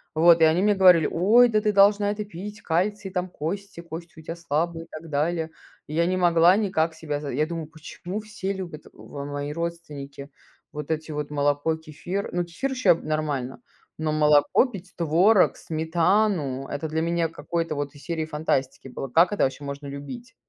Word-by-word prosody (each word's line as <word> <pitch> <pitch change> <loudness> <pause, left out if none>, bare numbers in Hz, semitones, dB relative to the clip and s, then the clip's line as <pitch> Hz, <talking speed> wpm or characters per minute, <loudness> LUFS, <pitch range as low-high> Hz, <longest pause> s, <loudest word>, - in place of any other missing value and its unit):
Вот 165 +1 +6
и - - +7
они 160 +3 +4
мне 210 0 +3
говорили: 180 -4 +6
"Ой, 220 +8 +5
да 215 -2 +1
ты 210 - +2
должна 205 +1 +4
это 210 0 -4
пить, 205 +3 -8
кальций, 190 +4 -1
там 185 -1 -2
кости 195 +4 -5
кости 170 0 -9
у - - -10
тя 165 +2 -5
слабые 165 0 -2
и - - -26
так 160 +1 -9
далее". 160 +2 -1 0.4
И 150 - -7
я 170 +1 +2
не 185 +1 0
могла 175 +1 +5
никак 170 -6 0
себя 150 -2 -4
за 145 - -5
я 150 +5 +1
думаю: 165 -1 -5
"Почему 160 +5 -7
все 210 -2 -5
любят 180 -6 -6
в 140 -1 -9
мои 145 0 -4
родственники 150 -4 -6 0.4
вот 150 +1 -5
эти 160 0 -3
вот 150 -1 -4
молоко, 145 +2 +1
кефир?" 160 +5 -5
Ну, 175 0 0
кефир 175 +11 -4
ещё 255 -9 +4
нормально, 150 -5 -3 0.4
но 155 -1 -1
молоко 150 - +4
пить, 195 -7 -9
творог, 180 +6 +4
сметану- 160 -3 0
это 145 +2 -4
для 160 +1 -1
меня 170 0 0
какой-то 165 +1 -3
вот 145 0 -4
из 145 - -14
серии 165 -2 -2
фантастики 150 -4 -2
было. 135 +2 -5
Как 165 +10 +4
это 205 - +1
вообще 135 +2 -1
можно 140 0 -6
любить? 235 - -8
165 Hz, 185 wpm, -25 LUFS, 150-185 Hz, 0.4 s, и